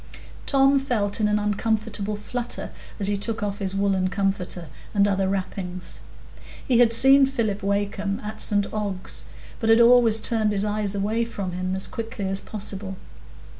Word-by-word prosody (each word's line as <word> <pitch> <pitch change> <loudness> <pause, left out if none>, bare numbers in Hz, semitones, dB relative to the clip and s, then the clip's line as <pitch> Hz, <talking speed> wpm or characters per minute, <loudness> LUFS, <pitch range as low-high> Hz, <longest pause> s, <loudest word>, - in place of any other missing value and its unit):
Tom 275 0 +4
felt 225 -6 -2
in 210 - +2
an 210 0 +2
uncomfortable 210 0 -1
flutter 240 +3 -5 0.3
as 200 - -1
he 205 +1 +1
took 215 +2 -3
off 205 -1 -3
his 195 -1 -2
woollen 195 -2 +1
comforter 190 -3 -2 0.3
and 200 0 +4
other 195 -1 0
wrappings. 185 -2 -5 0.7
He 245 -3 +3
had 240 -2 +5
seen 270 +3 +7
Philip 225 -7 -2
Wakem 200 0 -1
at 215 +1 -4
St 205 -1 +4
Ogg's, 200 -3 -3 0.3
but 225 - -1
had 225 +1 +6
always 235 -2 +6
turned 220 -2 +1
his 200 0 +1
eyes 210 -1 -1
away 215 +4 0
from 200 -5 -5
him 185 +1 -3
as 190 - -2
quickly 225 -3 -5
as 195 0 -1
possible. 195 -2 -5
205 Hz, 165 wpm, -24 LUFS, 195-225 Hz, 0.7 s, seen